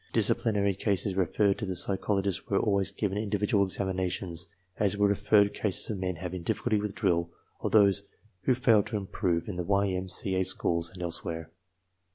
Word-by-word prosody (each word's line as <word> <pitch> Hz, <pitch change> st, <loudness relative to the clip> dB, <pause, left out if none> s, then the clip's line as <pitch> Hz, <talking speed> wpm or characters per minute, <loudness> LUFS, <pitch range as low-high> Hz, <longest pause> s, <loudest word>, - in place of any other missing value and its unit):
Disciplinary 100 Hz, -3 st, +2 dB
cases 100 Hz, 0 st, 0 dB
referred 95 Hz, +2 st, +1 dB
to -, -, -2 dB
the 95 Hz, -, -3 dB
psychol 95 Hz, +2 st, 0 dB
ogists 95 Hz, -3 st, -2 dB
were -, -, +2 dB
always 100 Hz, -1 st, +1 dB
given 100 Hz, 0 st, -2 dB
individual 105 Hz, -1 st, +1 dB
examinations, 95 Hz, -3 st, -1 dB, 0.3 s
as 105 Hz, -1 st, +1 dB
were 105 Hz, 0 st, +4 dB
re -, -, +4 dB
ferred 100 Hz, 0 st, +2 dB
eases 105 Hz, +1 st, 0 dB
of 100 Hz, -, -4 dB
men 90 Hz, -1 st, -2 dB
having 90 Hz, +1 st, -5 dB
difficulty 110 Hz, +5 st, 0 dB
with 105 Hz, -1 st, -4 dB
drill 85 Hz, -5 st, +1 dB, 0.3 s
or -, -, -2 dB
those 100 Hz, -2 st, +5 dB, 0.4 s
who 130 Hz, -, +3 dB
failed 115 Hz, -5 st, +3 dB
to 110 Hz, -1 st, -2 dB
improve 90 Hz, -4 st, -2 dB
in 100 Hz, -4 st, -5 dB
the 90 Hz, -, -1 dB
Y. 100 Hz, +2 st, +1 dB
M. 95 Hz, 0 st, -3 dB
C. 95 Hz, +1 st, -1 dB
A. 95 Hz, 0 st, +2 dB
schools 85 Hz, -2 st, +2 dB
and 90 Hz, -1 st, -8 dB
elsewhere. 80 Hz, -1 st, -4 dB
95 Hz, 190 wpm, -28 LUFS, 90-105 Hz, 0.4 s, those